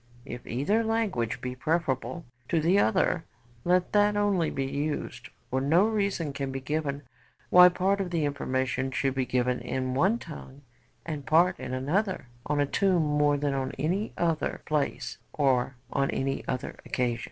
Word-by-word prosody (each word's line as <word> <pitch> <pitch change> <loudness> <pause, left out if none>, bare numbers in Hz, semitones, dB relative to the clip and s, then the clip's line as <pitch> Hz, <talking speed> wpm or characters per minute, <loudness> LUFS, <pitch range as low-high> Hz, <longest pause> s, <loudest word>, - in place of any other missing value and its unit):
If 125 - -8
either 175 - +1
language 220 - -1
be 125 0 -3
preferable 155 +3 -1 0.2
to 165 - +2
the 175 +6 +3
other, 110 - +2 0.4
let 180 +1 +2
that 205 0 +4
only 200 -6 +2
be 135 - -2
used; 145 +2 -3 0.2
for 130 +1 +1
no 165 +9 +4
reason 200 -9 -1
can 135 -1 -3
be 135 - -3
given 145 +1 -2 0.5
why 180 0 +9
part 195 +2 +1
of 185 - -3
the 165 -3 0
information 130 -2 -1
should 135 0 0
be 130 -1 -1
given 125 0 +1
in 130 +1 -2
one 190 - +3
tongue 145 - -10 0.4
and 150 -4 -4
part 170 +5 +3
in 130 -1 -5
another 180 +8 -1 0.2
on 150 0 0
a 145 - +3
tomb 180 +3 +2
more 150 -1 +2
than 145 0 0
in 135 -1 -2
any 185 +8 -1
other 165 -2 0
place, 150 -2 -2
or 130 -3 +1 0.2
on 140 - +1
any 135 0 -1
other 130 - -4
occasion.' 120 -2 -1
145 Hz, 165 wpm, -28 LUFS, 130-180 Hz, 0.5 s, why